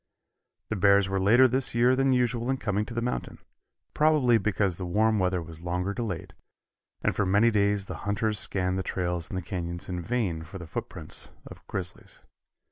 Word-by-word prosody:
The 110 - -1
bears 100 0 +4
were 95 0 -1
later 115 +7 +6
this 130 0 -1
year 120 +2 +4
than 135 0 +2
usual 120 -1 +1
in 135 - +1
coming 105 -3 -1
to 115 - -8
the 115 - -1
mountain, 125 - -3 0.6
probably 150 -7 +4
because 100 -3 0
the 90 - -3
warm 110 +4 +2
weather 90 -2 0
was 80 0 -10
longer 90 +3 -2
delayed, 100 -8 -4 0.7
and - - +1
for - - +1
many 100 +5 +4
days 100 -1 +1
the - - -6
hunters 105 +1 0
scanned 95 -1 0
the - - 0
trails 90 -3 -2
in - - -5
the 95 - -3
canyons 85 -2 -5
in 90 -1 -3
vain 100 -5 -1
for 85 +4 -9
the 90 - -8
footprints 80 - -5 0.2
of - - -12
grizzlies. 90 -2 -4
100 Hz, 190 wpm, -27 LUFS, 90-115 Hz, 0.7 s, later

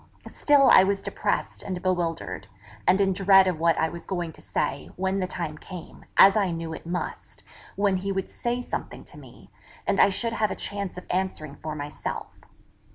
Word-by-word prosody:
Still 285 -2 +4
I 185 - +9
was 195 +1 +1
depressed - - -2
and 185 -2 -4
bewildered; 170 - -2 0.4
and 185 +2 +5
in 195 -1 +3
dread 195 0 +6
of 180 -4 -1
what 165 0 +3
I 160 - +1
was 170 +1 -9
going 175 -3 -2
to - - -16
say, 75 - -2
when 190 +1 -1
the 185 - -1
time 155 -4 -5
came, 180 -3 -10
as 195 0 +8
I 200 -3 +2
knew 165 -1 -4
it 160 - -9
must, 175 +1 -5 0.3
when 200 -2 +2
he 195 +2 -3
would 190 -1 -2
say 245 +1 -2
something - - -5
to - - -12
me, - - -15 0.3
and - - +1
I - - +6
should 230 +4 -1
have 220 -2 +1
a - - -3
chance 200 -3 -5
of 180 - -8
answering 180 -6 -2
for 155 -1 -4
myself. 145 0 -6
185 Hz, 195 wpm, -26 LUFS, 165-195 Hz, 0.4 s, I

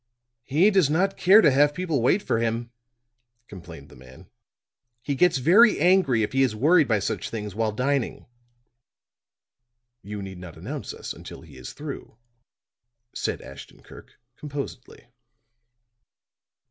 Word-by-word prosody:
"He 165 +10 +3
does 190 -8 +3
not 190 +6 +1
care 195 +5 +6
to 150 - +4
have 145 +2 +3
people 165 -7 -2
wait 180 - +2
for 115 - -1
him," 115 +1 -2 0.8
complained 85 -7 -12
the - - -16
man. 65 +1 -16 0.7
"He 140 - -2
gets 170 +2 +2
very 195 - +5
angry 165 - +3
if 105 - -3
he 135 - +2
is 125 -5 +1
worried 150 +6 +3
by 110 - +2
such 100 - -3
things 105 -3 -6
while 110 +1 -1
dining." 130 +3 -2 1.8
"You 105 0 -7
need 95 -2 -9
not 90 -2 -11
announce - - -6
us - - -7
until - - -11
he 80 -4 -16
is 65 - -9
through," 145 -6 -9 1.0
said - - -4
Ashton 70 -1 -13
Kirk, - - -16 0.2
composedly. 140 -3 -8
130 Hz, 140 wpm, -24 LUFS, 105-160 Hz, 1.8 s, care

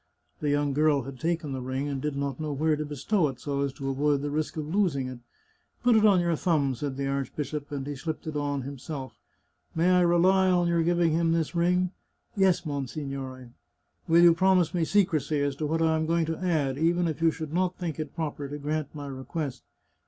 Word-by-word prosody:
The 150 - -1
young 145 -1 +1
girl 150 -1 +3
had 130 0 -9
taken 165 -3 -1
the 130 -1 -3
ring 130 +3 -3
and 140 -2 -3
did 150 -1 -2
not 140 -1 -3
know 155 -1 -3
where 155 +2 +1
to 150 - -3
bestow 150 +5 0
it 130 -3 -6
so 140 -1 -2
as 140 -1 0
to 135 -1 -6
avoid 140 +1 +1
the 145 - -2
risk 155 +2 -2
of 155 - -2
losing 165 -10 +1
it. 130 -1 -7 0.3
" - - -41
Put 245 -1 +5
it 215 0 +6
on 195 -3 +5
your 170 -1 +1
thumb," 150 -5 +1
said 135 +2 -4
the 140 - -2
archbishop, 140 +2 -3
and 140 -2 -4
he 145 0 -4
slipped 155 +3 -5
it 155 -1 -5
on 145 -2 -1
himself. 135 -2 -7 0.3
" - - -41
May 170 +3 +3
I 180 0 +5
rely 185 +2 +4
on 175 -1 +3
your 170 -1 +2
giving 170 0 +2
him 165 +1 +2
this 165 -1 -1
ring? 180 +1 +2
" - - -48
" - - -48
Yes, 190 -3 +3
monsignore." 135 -3 -5 0.3
" - - -43
Will 170 +1 +6
you 170 -1 +8
promise 185 -2 +3
me 170 -2 +1
secrecy 160 -7 +1
as 140 -1 0
to 155 - -2
what 165 +2 0
I 160 0 +3
am 160 0 -1
going 165 0 +2
to 160 0 -3
add, 150 -7 0
even 170 +2 +2
if 160 0 -4
you 165 - +5
should 160 -1 -5
not 180 +1 0
think 165 -4 -4
it 155 -2 -5
proper 150 -3 -3
to 145 +1 -6
grant 150 0 -3
my 145 -1 -6
request 135 0 -5
155 Hz, 235 wpm, -27 LUFS, 140-170 Hz, 0.3 s, you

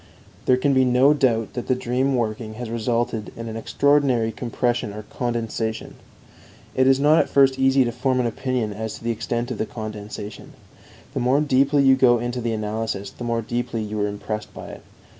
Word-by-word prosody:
There 130 - +5
can 140 +2 +2
be 130 0 +4
no 130 +3 +5
doubt 115 -6 +1
that 125 - -5
the 130 - +2
dream 130 +2 0
working 110 -2 -2
has 120 -1 -6
resulted 115 -1 -1
in 115 0 -6
an 110 - -6
extraordinary 130 -1 +2
compression 120 -2 -2
or 105 +1 -7
condensation. 115 -1 -3 0.8
It 130 0 +3
is 135 0 +5
not 150 +3 +5
at - - +1
first 135 -1 +4
easy 135 0 +4
to 120 - -1
form 130 +2 0
an 125 - +1
opinion 120 -2 -2
as 110 +1 -5
to - - -12
the 115 - 0
extent 120 +2 -3
of 120 - -5
the 110 - -1
condensation; 105 -1 -7 0.6
the - - -2
more 125 +3 +3
deeply 140 0 +3
you 135 -1 +6
go 125 -2 +5
into 120 +1 -3
the 115 0 -1
analysis, 105 -2 -3
the - - -9
more 115 -1 -1
deeply 120 -1 -3
you 105 0 -3
are 105 - +1
impressed 105 +1 -5
by - - -8
it. - - -10
120 Hz, 195 wpm, -23 LUFS, 110-130 Hz, 0.8 s, you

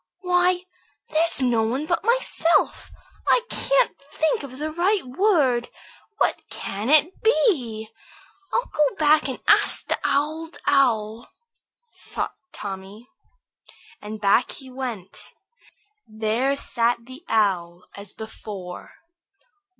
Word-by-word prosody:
"Why, 360 0 +2 0.5
there's 315 -3 +4
no 240 -3 +2
one 245 +7 -1
but 335 +1 -1
myself. 465 -7 +2 0.4
I - - +4
can't - - +2
think 300 +2 -1
of 265 -2 -9
the 305 +2 -4
right 360 +3 +1
word. 260 - +1 0.5
What - - +1
can 205 +5 -4
it 310 +4 +4
be? 270 - +1 0.6
I'll 485 - 0
go 295 -3 0
back 305 0 +3
and 260 - -5
ask - - +6
the - - -1
Old 315 +3 -1
Owl," 230 -5 +1 0.7
thought - - -5 0.2
Tommy. 200 +4 -8 0.9
And 215 +1 -7
back 205 +4 +2
he 265 -2 -8
went. 240 -8 -7 0.7
There 220 +5 -1
sat 235 -2 0
the 260 +6 -12
Owl 180 -5 0
as 200 -1 -9
before. 200 -4 -9
260 Hz, 110 wpm, -23 LUFS, 220-320 Hz, 0.9 s, ask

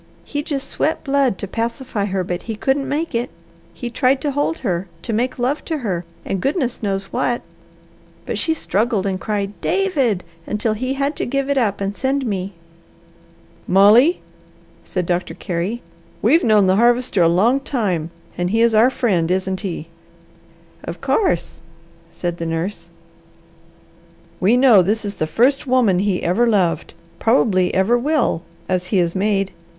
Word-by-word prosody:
He 290 - -3
just 280 -2 -4
sweat 315 - -1
blood 275 -7 +1
to 200 - -5
pacify 230 0 -3
her, 190 -2 -1
but 175 0 -3
he 225 - -5
couldn't 270 +6 0
make 315 +4 -2
it. 235 +2 -1 0.4
He 240 -2 -6
tried 260 +2 +2
to 290 - -1
hold 290 +4 -1
her, 180 -1 -1 0.2
to 230 - -3
make 245 +4 -1
love 260 +4 -1
to 320 - -2
her, 185 - -3 0.2
and 195 - -2
goodness 270 - -1
knows 195 -2 -3
what, 245 -1 0 0.8
but - - -3
she 320 - +1
struggled 215 -6 0
and 190 -1 -2
cried, 205 -2 -2
'David,' 275 - +1 0.2
until 210 +1 0
he 255 +5 -2
had 280 +2 -1
to - - -2
give 275 +2 -1
it 280 - +1
up 210 -5 0
and 200 0 -2
send 270 +2 -1
me." 195 -3 -3 1.1
"Molly," 215 - +5 0.6
said 180 -2 -3
Doctor 175 +1 -2
Carey, 185 +6 -3 0.4
"we've 330 +2 +4
known 215 -3 +4
the 185 +1 +3
Harvester 240 -3 +3
a 165 - +5
long 220 +10 +3
time, 200 - -1 0.3
and 175 0 0
he 225 +3 +1
is 235 -1 +3
our 220 +4 +6
friend, 190 -11 0
isn't 190 0 -1
he?" 170 -5 -5 1.0
"Of - - -6
course!" 175 - 0 0.5
said 175 0 -4
the 165 - -4
nurse. 165 +5 -3 1.5
"We 210 +7 +4
know 250 -7 +7
this 210 +4 0
is 200 -1 -5
the 155 - -1
first 265 - +2
woman 240 -8 +3
he 195 -2 0
ever 215 +8 +2
loved, 180 -8 +1 0.2
probably 215 -6 +3
ever 220 +6 +3
will, 280 - +1 0.3
as 180 -1 -1
he 195 - 0
is 170 -2 +1
made. 195 0 0
215 Hz, 165 wpm, -20 LUFS, 185-260 Hz, 1.5 s, know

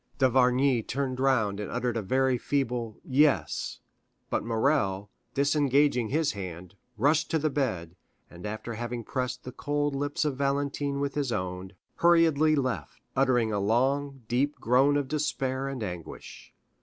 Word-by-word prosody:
D'Avrigny 130 -1 +3
turned 130 +2 -3
round 110 -7 +2
and 105 - -4
uttered 125 -1 -1
a 115 - 0
very 130 +5 +2
feeble 120 -6 -2
"Yes," 145 -2 +1 0.5
but - - 0
Morrel, 110 -4 0 0.2
disengaging 140 -4 +2
his 155 +2 +1
hand, 90 -3 -7 0.2
rushed 145 +7 +2
to 165 - +2
the 155 -1 0
bed, 90 - -2 0.3
and 90 +4 -9
after 110 +2 -5
having 120 +1 -4
pressed 125 +2 -3
the 125 - -7
cold 145 +2 -1
lips 145 +2 -1
of 140 -3 -1
Valentine 140 0 -1
with 140 -1 -1
his 140 -4 -1
own, 95 -2 -4 0.2
hurriedly 160 -3 +4
left, 125 - -2 0.2
uttering 125 -4 +2
a 100 - 0
long, 135 +6 0
deep 135 +5 +1
groan 135 +5 +3
of 140 -2 -1
despair 135 -2 -1
and 135 -4 -4
anguish. 90 -5 -8
130 Hz, 145 wpm, -28 LUFS, 115-145 Hz, 0.5 s, hurriedly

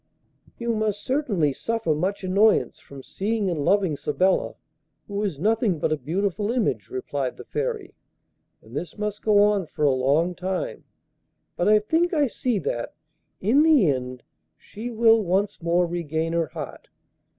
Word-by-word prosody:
'You 235 -1 -1
must 215 -2 -1
certainly 210 - +1
suffer 225 -1 -1
much 185 +7 -2
annoyance 200 +4 +3
from 140 -1 -12
seeing 205 - -2
and 155 -4 -2
loving 190 -3 +2
Sabella, 185 +7 0 0.5
who 200 0 -3
is 195 -8 -2
nothing 210 - +1
but 155 - -1
a - - +3
beautiful 195 - -2
image,' 135 - -1
replied 130 0 -3
the - - -9
Fairy, 450 -5 -3 0.7
'and - - -13
this 180 - -5
must 210 0 -3
go 210 -2 +3
on 205 -4 +2
for 150 0 -2
a 140 - +5
long 140 +7 +2
time; 185 +1 -4 0.7
but 175 - +1
I 215 - +7
think 325 - +1
I 295 -2 +3
see 250 -2 -1
that, 120 -10 -3 0.5
in 235 +10 +4
the 300 - +5
end, 125 -2 -5 0.3
she 225 +4 -8
will 225 -1 +4
once 195 +2 0
more 170 +1 +2
regain 165 -1 -2
her 165 -1 +1
heart. - - -8
195 Hz, 160 wpm, -24 LUFS, 160-220 Hz, 0.7 s, I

